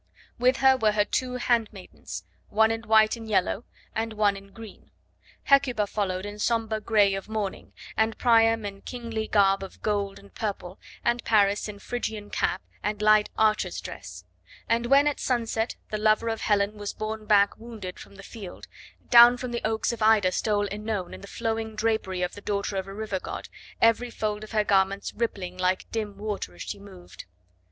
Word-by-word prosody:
With 255 Hz, +2 st, +3 dB
her 265 Hz, 0 st, +8 dB
were 215 Hz, -4 st, +2 dB
her 205 Hz, -1 st, +2 dB
two 250 Hz, +2 st, -2 dB
handmaidens 230 Hz, -6 st, -2 dB, 0.3 s
one 220 Hz, +1 st, +4 dB
in 225 Hz, +1 st, -4 dB
white 220 Hz, 0 st, +5 dB
and 225 Hz, -1 st, -9 dB
yellow 200 Hz, +2 st, +1 dB, 0.3 s
and 225 Hz, 0 st, -2 dB
one 210 Hz, -2 st, +2 dB
in 195 Hz, 0 st, -12 dB
green; 225 Hz, -1 st, -12 dB, 0.5 s
Hecuba 270 Hz, -6 st, +3 dB
followed 195 Hz, -2 st, -2 dB
in 205 Hz, 0 st, -7 dB
sombre 220 Hz, -1 st, 0 dB
grey 205 Hz, -2 st, +3 dB
of 195 Hz, +2 st, -5 dB
mourning, 210 Hz, -3 st, -4 dB, 0.2 s
and 220 Hz, 0 st, +1 dB
Priam 225 Hz, -2 st, +4 dB
in 200 Hz, -1 st, -6 dB
kingly 230 Hz, -3 st, -5 dB
garb 195 Hz, -2 st, +3 dB
of 195 Hz, -, -10 dB
gold 200 Hz, -2 st, -1 dB
and 200 Hz, -, -16 dB
purple, 195 Hz, -3 st, -5 dB, 0.3 s
and 240 Hz, 0 st, +1 dB
Paris 205 Hz, -2 st, +3 dB
in 205 Hz, -, -7 dB
Phrygian 215 Hz, -1 st, -5 dB
cap -, -, -1 dB, 0.2 s
and 210 Hz, 0 st, -2 dB
light 215 Hz, 0 st, +4 dB
archer's 215 Hz, -4 st, +2 dB
dress; 90 Hz, -1 st, -9 dB, 0.4 s
and 235 Hz, +1 st, +1 dB
when 275 Hz, +3 st, +5 dB
at 295 Hz, -1 st, 0 dB
sunset 230 Hz, -2 st, -1 dB, 0.2 s
the 215 Hz, -, -2 dB
lover 215 Hz, +2 st, +3 dB
of 225 Hz, -1 st, -3 dB
Helen 210 Hz, 0 st, +1 dB
was 205 Hz, -1 st, -4 dB
borne 215 Hz, 0 st, -5 dB
back 205 Hz, -1 st, +4 dB
wounded 220 Hz, -6 st, -8 dB
from -, -, -13 dB
the 195 Hz, -, -12 dB
field, 200 Hz, -3 st, -9 dB, 0.5 s
down 240 Hz, +1 st, +9 dB
from 250 Hz, 0 st, -5 dB
the 235 Hz, -, -2 dB
oaks 220 Hz, +1 st, 0 dB
of 235 Hz, -, -7 dB
Ida 215 Hz, -4 st, +5 dB
stole 205 Hz, +1 st, 0 dB
OEnone 210 Hz, -3 st, -4 dB
in -, -, -9 dB
the 200 Hz, -, -10 dB
flowing 225 Hz, 0 st, -3 dB
drapery 215 Hz, -5 st, 0 dB
of 180 Hz, -, -2 dB
the 205 Hz, -, -10 dB
daughter 200 Hz, 0 st, -2 dB
of 190 Hz, 0 st, -3 dB
a 195 Hz, -, -8 dB
river 210 Hz, -3 st, -3 dB
god, -, -, -7 dB, 0.3 s
every 230 Hz, +2 st, +3 dB
fold 215 Hz, -2 st, -3 dB
of 215 Hz, -, -9 dB
her 215 Hz, -2 st, +2 dB
garments 195 Hz, 0 st, +1 dB
rippling 185 Hz, -6 st, -3 dB
like 185 Hz, 0 st, 0 dB
dim 210 Hz, -3 st, -3 dB
water 205 Hz, -, -4 dB
as 85 Hz, -, -7 dB
she -, -, -6 dB
moved. 190 Hz, -3 st, -12 dB
215 Hz, 185 wpm, -26 LUFS, 200-225 Hz, 0.5 s, down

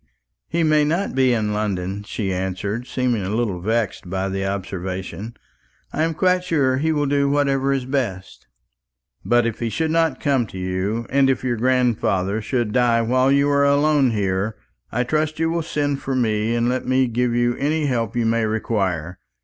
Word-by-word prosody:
"He 170 Hz, 0 st, 0 dB
may 155 Hz, -1 st, +4 dB
not 170 Hz, +7 st, 0 dB
be 130 Hz, -1 st, +3 dB
in 110 Hz, -3 st, 0 dB
London," 100 Hz, -2 st, -2 dB
she 105 Hz, -2 st, -3 dB
answered, 95 Hz, +6 st, -3 dB
seeming 125 Hz, -4 st, 0 dB
a 95 Hz, -, -3 dB
little 110 Hz, -6 st, -1 dB
vexed 110 Hz, -2 st, -1 dB
by 95 Hz, +1 st, -2 dB
the 95 Hz, 0 st, -2 dB
observation. 95 Hz, +3 st, -5 dB, 0.6 s
"I 155 Hz, -, -1 dB
am 165 Hz, 0 st, 0 dB
quite 180 Hz, +2 st, +2 dB
sure 145 Hz, -7 st, +1 dB
that -, -, -2 dB
he 160 Hz, +1 st, +1 dB
will 145 Hz, -2 st, +1 dB
do 140 Hz, 0 st, +1 dB
whatever 140 Hz, -1 st, +1 dB
is 135 Hz, -2 st, -1 dB
best." 120 Hz, -, -3 dB, 0.8 s
"But 120 Hz, 0 st, +3 dB
if 115 Hz, -2 st, -2 dB
he 115 Hz, -, -1 dB
should 160 Hz, +9 st, -1 dB
not 165 Hz, 0 st, +1 dB
come 135 Hz, -5 st, +1 dB
to 95 Hz, -, -10 dB
you, 95 Hz, +5 st, -2 dB
and 135 Hz, 0 st, +4 dB
if 130 Hz, -, 0 dB
your 125 Hz, -2 st, 0 dB
grandfather 110 Hz, -5 st, +1 dB
should 120 Hz, -1 st, -1 dB
die 120 Hz, -2 st, +3 dB
while 130 Hz, +3 st, +2 dB
you 140 Hz, +1 st, +3 dB
are 140 Hz, 0 st, +3 dB
alone 140 Hz, -1 st, +3 dB
here, 100 Hz, -1 st, -1 dB, 0.4 s
I 120 Hz, +2 st, 0 dB
trust 155 Hz, +4 st, -1 dB
you 165 Hz, +1 st, 0 dB
will 170 Hz, 0 st, 0 dB
send 145 Hz, -3 st, -2 dB
for 135 Hz, -, -2 dB
me 110 Hz, -2 st, +1 dB
and 120 Hz, 0 st, +1 dB
let 125 Hz, +1 st, -1 dB
me 130 Hz, 0 st, +3 dB
give 120 Hz, 0 st, 0 dB
you 120 Hz, 0 st, +2 dB
any 150 Hz, +2 st, 0 dB
help 120 Hz, -6 st, -1 dB
you 120 Hz, -1 st, +1 dB
may 115 Hz, 0 st, +1 dB
require. 95 Hz, -6 st, -2 dB
120 Hz, 190 wpm, -21 LUFS, 105-140 Hz, 0.8 s, may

